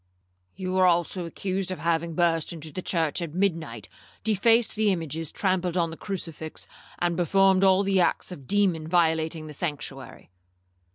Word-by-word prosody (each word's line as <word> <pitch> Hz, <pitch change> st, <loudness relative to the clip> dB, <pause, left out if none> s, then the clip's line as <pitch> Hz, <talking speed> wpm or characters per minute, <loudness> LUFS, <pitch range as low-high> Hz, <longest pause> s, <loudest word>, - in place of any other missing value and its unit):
'—'You 185 Hz, 0 st, -3 dB
are 185 Hz, -, +6 dB
also 175 Hz, 0 st, +1 dB
accused 190 Hz, +2 st, -3 dB
of 185 Hz, -, -3 dB
having 165 Hz, +1 st, -1 dB
burst 165 Hz, -2 st, +1 dB
into 160 Hz, -2 st, -7 dB
the 185 Hz, -, -5 dB
church 165 Hz, -2 st, 0 dB
at 165 Hz, -2 st, -5 dB
midnight, 165 Hz, -, -1 dB, 0.4 s
defaced 225 Hz, +2 st, +3 dB
the 215 Hz, -1 st, +2 dB
images, 165 Hz, -3 st, -3 dB
trampled 185 Hz, -2 st, 0 dB
on 165 Hz, -2 st, +1 dB
the -, -, -6 dB
crucifix, 165 Hz, -5 st, -6 dB, 0.3 s
and 175 Hz, -1 st, 0 dB
performed 190 Hz, +2 st, +3 dB
all 190 Hz, 0 st, +5 dB
the 195 Hz, -1 st, +2 dB
acts 175 Hz, -, 0 dB
of 180 Hz, -, -7 dB
a -, -, -15 dB
demon 175 Hz, 0 st, +1 dB
violating 160 Hz, -1 st, +1 dB
the 155 Hz, -, -8 dB
sanctuary.' 145 Hz, -, -5 dB
175 Hz, 165 wpm, -26 LUFS, 160-190 Hz, 0.4 s, are